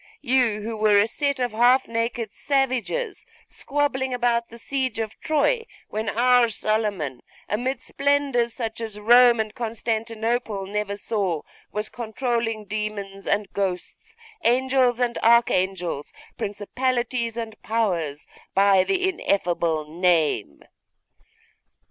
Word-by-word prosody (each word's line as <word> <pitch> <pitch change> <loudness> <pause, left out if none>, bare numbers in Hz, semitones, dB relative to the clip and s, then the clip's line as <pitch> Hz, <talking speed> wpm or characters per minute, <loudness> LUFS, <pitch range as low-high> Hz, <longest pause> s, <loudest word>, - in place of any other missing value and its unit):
You, 245 -4 +2
who 225 +1 -4
were 210 -1 +4
a 200 - +5
set 280 +4 -1
of 245 -2 0
half 245 +4 +4
naked 230 -1 -2
savages 275 - -1 0.2
squabbling 270 -3 -1
about 235 -1 +1
the 235 - -11
siege 260 0 -2
of 220 -1 -4
Troy, 455 +10 +1 0.2
when 215 +1 -2
our 245 0 +4
Solomon, 205 - -1 0.3
amid 250 +4 -2
splendours 280 -4 +1
such 225 -1 -5
as 215 -2 -5
Rome 240 +2 +6
and 215 -1 -2
Constantinople 225 -2 -2
never 200 0 -3
saw, 195 -7 -2 0.3
was 210 +1 -2
controlling 230 -1 -2
demons 200 -1 -5
and 210 -1 0
ghosts, 190 - -4 0.3
angels 255 0 +3
and 240 -1 0
archangels, 190 -9 +2 0.2
principalities 235 +3 -2
and 225 -2 -6
powers, 175 -10 -1 0.3
by 195 -1 +5
the 375 - +1
ineffable 170 - 0
name? 160 - +1
225 Hz, 115 wpm, -24 LUFS, 205-250 Hz, 0.3 s, Rome